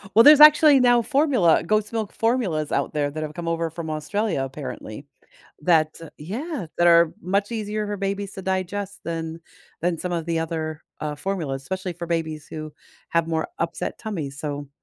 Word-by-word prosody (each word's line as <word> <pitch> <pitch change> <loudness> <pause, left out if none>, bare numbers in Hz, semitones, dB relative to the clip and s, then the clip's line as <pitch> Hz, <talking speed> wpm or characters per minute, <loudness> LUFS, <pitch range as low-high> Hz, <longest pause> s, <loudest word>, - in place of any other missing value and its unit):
Well, 230 - +8
there's 295 +2 +9
actually 300 -1 +8
now 245 -1 +5
formula 260 - +3
goat's 215 +3 0
milk 220 -3 -3
formulas 220 - 0
out - - -1
there 145 -1 0
that 155 +2 -5
have 155 -1 -5
come 170 +1 -6
over 165 0 -1
from 165 0 -6
Australia, 165 +1 -1
apparently, 135 -2 -7 0.6
that 155 -1 +2 0.2
yeah, 225 - -5
that 175 - +3
are 170 -1 +6
much 200 +4 0
easier 215 -1 -3
for 205 0 -3
babies 200 0 -3
to 190 - -8
digest 190 +1 -3
than 165 0 -4 0.4
than 175 +1 0
some 180 +2 -3
of 170 -2 -2
the 165 -1 0
other, 160 -1 -4 0.2
uh, 150 -1 -3
formulas, 150 -6 -3
especially 185 +4 -4
for 170 +1 -6
babies 160 -3 -3
who 155 -1 -6 0.4
have 170 -1 +2
more 160 -1 -1
upset 165 0 -3
tummies, 155 -11 -5
so 145 -1 -5
170 Hz, 180 wpm, -23 LUFS, 155-205 Hz, 0.6 s, there's